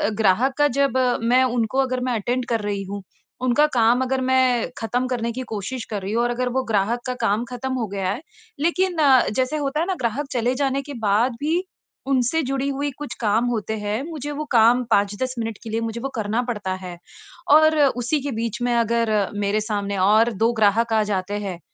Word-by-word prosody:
ग्राहक 220 Hz, +5 st, +2 dB
का 290 Hz, 0 st, +4 dB
जब 275 Hz, -2 st, +2 dB, 0.3 s
मैं 250 Hz, +3 st, +4 dB
उनको 245 Hz, -1 st, 0 dB
अगर 255 Hz, -1 st, -1 dB
मैं 250 Hz, -, 0 dB
अटेंड 245 Hz, +4 st, -1 dB
कर 230 Hz, -1 st, +1 dB
रही 205 Hz, -1 st, -3 dB
हूँ 200 Hz, 0 st, -5 dB, 0.4 s
उनका 255 Hz, +4 st, +4 dB
काम 235 Hz, +2 st, +4 dB
अगर 260 Hz, 0 st, -1 dB
मैं 255 Hz, -2 st, +2 dB
ख़त्म 245 Hz, +3 st, -1 dB
करने 235 Hz, -2 st, -2 dB
की 255 Hz, +3 st, -5 dB
कोशिश 225 Hz, +4 st, -5 dB
कर 205 Hz, -2 st, -2 dB
रही 190 Hz, +2 st, -4 dB
हूँ 230 Hz, -, +2 dB
और 240 Hz, -, +1 dB
अगर 250 Hz, +1 st, -1 dB
वो 260 Hz, -, +1 dB
ग्राहक 220 Hz, +1 st, 0 dB
का 255 Hz, -, -2 dB
काम 210 Hz, +4 st, +1 dB
ख़त्म 255 Hz, +1 st, -4 dB
हो 245 Hz, -4 st, -2 dB
गया 195 Hz, -2 st, -1 dB
है, 240 Hz, -, -4 dB, 0.4 s
लेकिन 350 Hz, +3 st, +1 dB, 0.4 s
जैसे 260 Hz, +4 st, 0 dB
होता 275 Hz, +2 st, -1 dB
है 330 Hz, -, +1 dB
ना 385 Hz, -, 0 dB
ग्राहक 250 Hz, +4 st, -1 dB
चले 245 Hz, 0 st, 0 dB
जाने 275 Hz, 0 st, +1 dB
के -, -, -5 dB
बाद 225 Hz, +6 st, +2 dB
भी 325 Hz, +5 st, 0 dB, 0.5 s
उनसे 260 Hz, +5 st, +2 dB
जुड़ी 270 Hz, +1 st, -2 dB
हुई 280 Hz, +1 st, -2 dB
कुछ 290 Hz, -5 st, -6 dB
काम 220 Hz, +1 st, +1 dB
होते 220 Hz, -2 st, -2 dB
हैं। 210 Hz, +2 st, -2 dB
मुझे 295 Hz, -3 st, -5 dB
वो 305 Hz, -, -3 dB
काम 240 Hz, +1 st, +5 dB
5-10 205 Hz, +6 st, +1 dB
मिनट 225 Hz, -2 st, -3 dB
के 225 Hz, -, -7 dB
लिए 225 Hz, +1 st, -1 dB
मुझे 230 Hz, +1 st, -4 dB
वो 275 Hz, -, -3 dB
करना 220 Hz, +1 st, 0 dB
पड़ता 210 Hz, -6 st, -2 dB
है 180 Hz, -1 st, -7 dB, 0.6 s
और 310 Hz, 0 st, +5 dB
उसी 265 Hz, 0 st, +2 dB
के 280 Hz, +1 st, -3 dB
बीच 230 Hz, 0 st, -3 dB
में 245 Hz, 0 st, +1 dB
अगर 230 Hz, -1 st, +1 dB, 0.3 s
मेरे 205 Hz, +1 st, 0 dB
सामने 205 Hz, -2 st, -2 dB
और 220 Hz, +3 st, +4 dB
2 230 Hz, -, +4 dB
ग्राहक 225 Hz, +1 st, +2 dB
आ 220 Hz, -, +4 dB
जाते 190 Hz, 0 st, -2 dB
हैं 185 Hz, -4 st, -5 dB
240 Hz, 210 wpm, -22 LUFS, 215-260 Hz, 0.6 s, काम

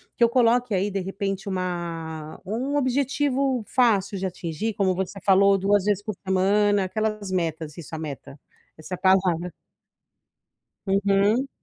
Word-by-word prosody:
que 235 Hz, -, +2 dB
eu 235 Hz, -, +5 dB
coloque 240 Hz, -1 st, +2 dB
aí 195 Hz, +2 st, +1 dB
de 195 Hz, -1 st, -2 dB
repente 195 Hz, +1 st, -4 dB
uma 170 Hz, -4 st, -4 dB
um 255 Hz, +8 st, -2 dB
objetivo 270 Hz, -1 st, +1 dB
fácil 205 Hz, -6 st, +2 dB
de 190 Hz, -, -3 dB
atingir 185 Hz, +3 st, -3 dB
como 185 Hz, -2 st, +1 dB
você 190 Hz, +1 st, -4 dB
falou 195 Hz, 0 st, +5 dB
2 200 Hz, +1 st, +2 dB
vezes 205 Hz, -1 st, +1 dB
por 210 Hz, -2 st, -5 dB
semana, 200 Hz, +1 st, +2 dB
aquelas 215 Hz, +1 st, -2 dB
metas 160 Hz, -4 st, -3 dB
isso 165 Hz, -2 st, -10 dB
a 160 Hz, -, -3 dB
meta, 145 Hz, -2 st, -8 dB, 0.4 s
essa 155 Hz, +4 st, -9 dB
é -, -, +1 dB
a -, -, -12 dB
palavra. 180 Hz, -2 st, +2 dB, 1.4 s
Uhum. 200 Hz, +5 st, +2 dB
195 Hz, 150 wpm, -24 LUFS, 180-215 Hz, 1.4 s, eu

